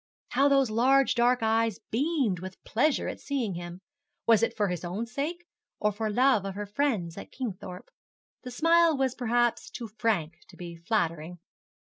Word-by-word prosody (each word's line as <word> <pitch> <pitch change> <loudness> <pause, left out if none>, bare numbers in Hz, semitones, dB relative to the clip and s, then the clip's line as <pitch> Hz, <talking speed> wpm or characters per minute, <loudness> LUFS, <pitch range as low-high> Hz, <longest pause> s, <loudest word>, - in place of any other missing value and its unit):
How 275 +3 +3
those 275 -4 +3
large 265 +4 +4
dark 245 0 +2
eyes 225 -1 +1
beamed 260 - 0
with 185 +1 -9
pleasure 275 +7 +1
at - - -5
seeing 260 -8 -2
him! 175 +1 -7 0.4
Was 225 -2 +5
it 230 0 0
for 205 -2 +1
his 180 -1 -4
own 185 +6 -3
sake, 295 +9 -4 0.3
or 210 - +2
for 215 +1 -3
love 245 -1 +3
of 195 -1 -5
her 205 +1 -4
friends 205 - -1
at - - -11
Kingthorpe? 190 -7 -7 0.5
The 250 - -8
smile 330 +4 +3
was 265 -2 +1
perhaps 240 -1 0
too 235 -3 -7
frank 175 -8 0
to - - -16
be 170 -1 -8
flattering. 170 -2 -2
225 Hz, 170 wpm, -28 LUFS, 190-265 Hz, 0.5 s, Was